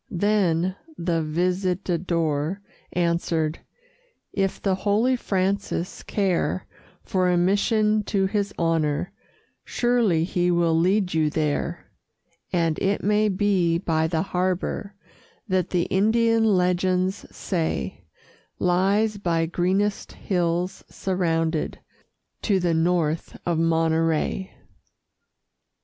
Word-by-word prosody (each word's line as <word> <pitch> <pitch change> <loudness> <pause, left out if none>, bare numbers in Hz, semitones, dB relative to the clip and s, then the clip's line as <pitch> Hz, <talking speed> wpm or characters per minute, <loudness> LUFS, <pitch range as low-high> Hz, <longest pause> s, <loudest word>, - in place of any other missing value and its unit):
Then 185 -3 +1 0.2
the 170 -1 0
Visitador 175 -1 -1 0.3
answered: 170 -2 0 0.7
"If 195 -1 -1
the 195 - +1
holy 210 +7 +2
Francis 195 -4 -2
care 190 -2 -1 0.4
For 185 -1 +1
a 180 - +3
mission 210 +4 +2
to 195 -2 +1
his 200 +1 -1
honor, 165 0 0 0.5
Surely 235 -9 +1
he 175 0 0
will 170 -1 +2
lead 185 +2 +2
you 155 -1 +2
there; 150 -1 -2 0.6
And 165 -3 +1
it 200 +1 0
may 210 +1 +3
be 185 -4 +2
by 160 -2 0
the 160 0 0
harbor 185 +2 -2 0.5
That 185 -3 0
the 175 -2 +1
Indian 225 +4 +2
legends 185 -1 +1
say 160 - -3 0.5
Lies 200 +4 +1
by 165 -4 +1
greenest 190 +5 -1
hills 175 0 -1
surrounded 165 -4 -1 0.6
To 200 -3 +2
the 175 -2 +1
north 165 -1 0
of 170 -2 0
Monterey." 165 +2 +1
180 Hz, 100 wpm, -24 LUFS, 165-195 Hz, 0.7 s, a